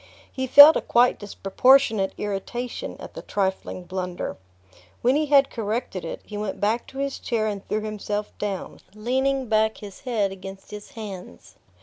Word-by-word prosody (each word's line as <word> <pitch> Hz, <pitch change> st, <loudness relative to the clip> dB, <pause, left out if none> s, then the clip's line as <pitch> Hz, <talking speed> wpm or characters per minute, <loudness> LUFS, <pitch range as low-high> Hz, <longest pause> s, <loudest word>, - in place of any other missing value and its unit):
He 260 Hz, 0 st, -3 dB
felt 290 Hz, +4 st, +10 dB
a -, -, +1 dB
quite 245 Hz, +1 st, +3 dB
disproportionate 205 Hz, +1 st, +2 dB
irritation 210 Hz, +5 st, -4 dB
at -, -, -10 dB
the -, -, -7 dB
trifling 190 Hz, -2 st, -2 dB
blunder. 180 Hz, 0 st, -4 dB, 0.7 s
When 255 Hz, +3 st, +4 dB
he 305 Hz, +1 st, +1 dB
had 280 Hz, -1 st, +4 dB
corrected 220 Hz, -4 st, -3 dB
it 165 Hz, -, -6 dB
he 210 Hz, -, -7 dB
went 205 Hz, -2 st, -4 dB
back 220 Hz, +3 st, 0 dB
to 270 Hz, -, -12 dB
his 275 Hz, 0 st, -3 dB
chair 225 Hz, -2 st, -1 dB
and 205 Hz, -2 st, -3 dB
threw 215 Hz, -, -1 dB
himself 210 Hz, -1 st, -4 dB
down, 200 Hz, -2 st, -4 dB, 0.2 s
leaning 265 Hz, +4 st, 0 dB
back 220 Hz, 0 st, +2 dB
his 200 Hz, -2 st, -10 dB
head 220 Hz, -6 st, -1 dB
against 195 Hz, 0 st, -10 dB
his 210 Hz, +6 st, -10 dB
hands. 185 Hz, -, -9 dB
215 Hz, 160 wpm, -24 LUFS, 195-250 Hz, 0.7 s, felt